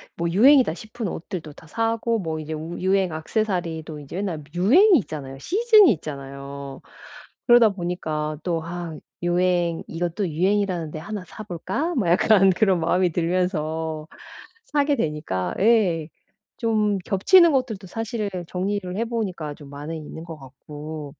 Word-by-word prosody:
뭐 170 0 -1
유행이다 250 - +5
싶은 220 +2 -6
옷들도 165 -4 -6
다 155 - -16
사고 230 +3 0
뭐 160 -4 -3
이제 155 +1 -5
우 160 +3 -6
유행 190 -1 +1
액세서리도 160 -3 -2
이제 145 +5 -8
맨날 175 -7 -3
유행이 320 - +6
있잖아요. 135 -7 -7
시즌이 425 - +5
있잖아요. 140 -2 -8 0.7
그러다 240 -2 +7
보니까 160 -5 -3
또 170 -3 -1
아 170 -1 -6 0.3
유행 175 -1 +1
'이것도 175 +3 -2
유행이라는 180 -1 0
데 155 - -6
하나 205 +2 -6
사 215 - -11
볼까?' 275 - -3
뭐 210 -9 0
약간 195 +2 +5
그런 190 -1 +2
마음이 180 +2 +2
들면서 160 -3 -1 0.6
사게 290 -1 +1
되니까 150 - -2
예 190 -8 +3 0.5
좀 215 -4 +1
겹치는 325 - +5
것들도 225 -8 -1
사실 225 +1 -3 0.2
정리를 185 0 -2
해 230 - 0
보니까 185 -10 -3
좀 145 -1 -13
많이 145 +3 -6
있는 160 +2 -9
것 165 -2 -9
같고 150 +2 -9
175 Hz, 305 characters per minute, -23 LUFS, 155-215 Hz, 0.7 s, 그러다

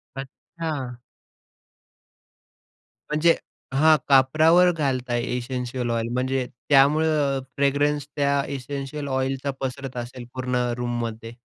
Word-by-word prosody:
अच्छा. 135 -1 -6 2.1
म्हणजे 165 +2 +4 0.4
हां, 155 +3 +5
कापरावर 155 +7 +5
घालताय 130 -6 -1 0.2
इसेंशियल 125 0 -3
ऑइल. 115 0 -1
म्हणजे 130 +1 0 0.2
त्यामुळे 145 +3 +5
अ, 140 -3 +1 0.2
फ्रॅग्रन्स 145 +1 +1
त्या 140 -1 +2
इसेंशियल 140 +2 -5
ऑइलचा 135 +1 -1
पसरत 135 -1 -4
असेल 120 +1 -6
पूर्ण 125 -1 -2 0.2
रूममध्ये? 115 -2 -4
135 Hz, 95 wpm, -24 LUFS, 125-145 Hz, 2.1 s, हां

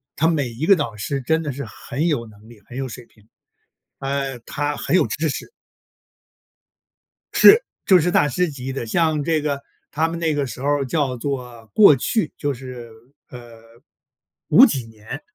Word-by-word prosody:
他 160 - +2
每 145 -7 0
一 125 +8 -4
个 195 - +7
导 130 - -3
师 135 +7 -3
真 160 +5 0
的 150 -3 -3
是 140 0 -6
很 120 - -5
有 145 -9 0
能 105 0 -17
力、 115 -3 -16
很 125 - -9
有 135 -1 -3
水 125 0 -10
平， 105 -1 -26 0.7
呃， 135 -1 -3
他 145 +4 -3
很 - - -1
有 - - +3
知 160 +1 -2
识。 - - -5 1.8
是， 450 +4 +8 0.2
就 185 -2 +6
是 175 +3 +1
大 150 - +3
师 170 +5 0
级 135 -2 -6
的。 130 -3 -4
像 155 +3 +1
这 160 -1 +1
个 140 -2 -2 0.3
他 160 +2 +1
们 165 0 -5
那 160 -2 0
个 145 -1 -1
时 125 0 -8
候 145 0 +1
叫 135 -2 -1
做 125 -4 -5
过 200 -9 +7
去， 160 - -1
就 145 -1 -1
是， 125 -2 -9 0.4
呃， 120 -2 -12 0.9
5 - - +9
几 135 - -1
年， 110 -1 -9
140 Hz, 190 characters per minute, -21 LUFS, 120-155 Hz, 1.8 s, 5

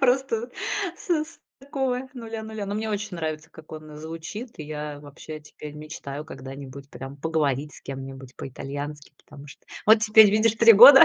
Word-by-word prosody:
просто 250 -2 +2 0.5
с - - -13
с 310 0 0 0.2
такого 265 -2 -1
нуля 225 -2 -5
нуля. 220 -2 -5
Но 200 - -2
мне 220 0 -1
очень 205 -2 -3
нравится, 155 -1 -3
как 160 -1 -14
он 155 -1 -8
звучит, 165 +10 -7
и 155 - -5
я 150 -1 -5
вообще 145 +2 -9
теперь 150 0 -10
мечтаю 150 -1 -6
когда-нибудь 135 -1 -9
прям 135 +1 -8
поговорить 150 -2 0
с - - -12
кем-нибудь 135 -1 -7
по-итальянски, 145 +2 -6
потому 145 0 -12
что 135 -3 -14 0.2
вот 220 0 +8
теперь, 220 -1 +8
видишь, 215 +1 +4
3 230 +1 +9
года 255 +6 +12
155 Hz, 170 wpm, -26 LUFS, 145-220 Hz, 0.5 s, года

